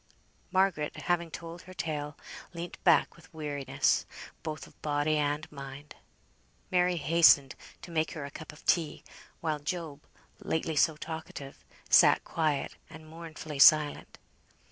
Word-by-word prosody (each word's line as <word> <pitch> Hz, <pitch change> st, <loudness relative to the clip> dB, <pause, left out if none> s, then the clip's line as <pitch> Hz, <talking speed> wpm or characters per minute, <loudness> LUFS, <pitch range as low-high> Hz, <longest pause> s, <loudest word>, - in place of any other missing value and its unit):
Margaret, 185 Hz, -6 st, +1 dB
having 170 Hz, -1 st, 0 dB
told 165 Hz, +1 st, -8 dB
her 185 Hz, 0 st, -13 dB
tale, 150 Hz, -3 st, -4 dB, 0.4 s
leant 170 Hz, +1 st, -7 dB
back 170 Hz, -3 st, +4 dB
with 170 Hz, -, -18 dB
weariness, 145 Hz, -3 st, 0 dB, 0.3 s
both 155 Hz, -1 st, -5 dB
of -, -, -20 dB
body 150 Hz, +1 st, +1 dB
and 150 Hz, +1 st, 0 dB
mind. 140 Hz, 0 st, -9 dB, 0.8 s
Mary 180 Hz, 0 st, +3 dB
hastened 150 Hz, -3 st, +5 dB, 0.3 s
to 175 Hz, -, -9 dB
make 160 Hz, -1 st, 0 dB
her 150 Hz, -3 st, -5 dB
a 140 Hz, -, -8 dB
cup 155 Hz, +2 st, -9 dB
of 150 Hz, -, -17 dB
tea; 160 Hz, -4 st, +1 dB, 0.4 s
while 155 Hz, -2 st, -1 dB
Job, 150 Hz, -1 st, -5 dB, 0.4 s
lately 160 Hz, 0 st, -2 dB
so 155 Hz, +1 st, +3 dB
talkative, 155 Hz, -3 st, -8 dB, 0.2 s
sat -, -, +6 dB
quiet 155 Hz, -4 st, -1 dB
and 155 Hz, 0 st, -12 dB
mournfully 155 Hz, -2 st, -8 dB
silent. 150 Hz, +1 st, +5 dB
155 Hz, 135 wpm, -30 LUFS, 145-165 Hz, 0.8 s, sat